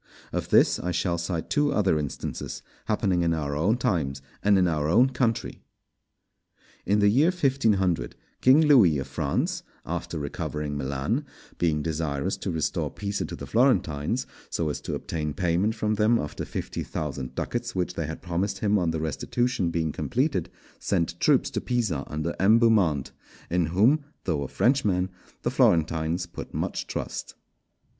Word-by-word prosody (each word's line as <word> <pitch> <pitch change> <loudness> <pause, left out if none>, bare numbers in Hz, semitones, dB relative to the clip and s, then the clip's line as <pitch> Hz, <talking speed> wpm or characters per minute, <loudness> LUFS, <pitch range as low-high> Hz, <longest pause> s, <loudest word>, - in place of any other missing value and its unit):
Of - - -2
this - - +5
I 90 - -3
shall 85 0 0
cite 85 -1 -3
two 145 -1 +2
other 95 -7 +2
instances 75 -3 -5 0.2
happening 95 -4 +1
in 85 -1 +2
our 70 -2 -2
own 95 +11 +2
times, 80 - 0 0.2
and 100 -1 +4
in 90 -1 +4
our 75 -3 0
own 125 +9 +5
country. 120 -2 -1 1.3
In 100 +3 +3
the 105 - +5
year 130 +10 +4
1500, 115 - +1 0.3
King 135 +5 +6
Louis 120 - +6
of 65 - -3
France, 70 +1 -1 0.2
after - - -4
recovering 75 0 -4
Milan, 70 - -1 0.4
being 75 -3 +1
desirous 75 -4 -1
to - - -4
restore 80 -2 -1
Pisa 100 0 -3
to - - -6
the - - -7
Florentines, 95 - +1 0.2
so 80 -2 -1
as 75 - -4
to - - -3
obtain 75 -3 -3
payment 90 +6 +1
from 105 -1 0
them 110 +2 +3
of 75 -8 -4
the - - -5
fifty - - -4
thousand 65 -4 -4
ducats 120 -1 -3
which 90 -1 -1
they 80 - -3
had 80 - -7
promised 95 +3 -1
him 105 -1 +2
on 85 -2 +1
the 80 -1 -1
restitution 95 - -1
being 80 -2 -1
completed, - - -1 0.3
sent 85 -2 -1
troops - - +3
to - - -2
Pisa 105 - -1
under 75 +3 -3
M. 105 +4 +6
Beaumont, 100 - +3 0.4
in 90 -2 +2
whom, 115 - +3 0.2
though 80 -6 -1
a 70 - -3
Frenchman, 100 - +1 0.3
the - - 0
Florentines 80 +1 +2
put - - -9
much - - -2
trust. - - -5
90 Hz, 165 wpm, -26 LUFS, 80-110 Hz, 1.3 s, King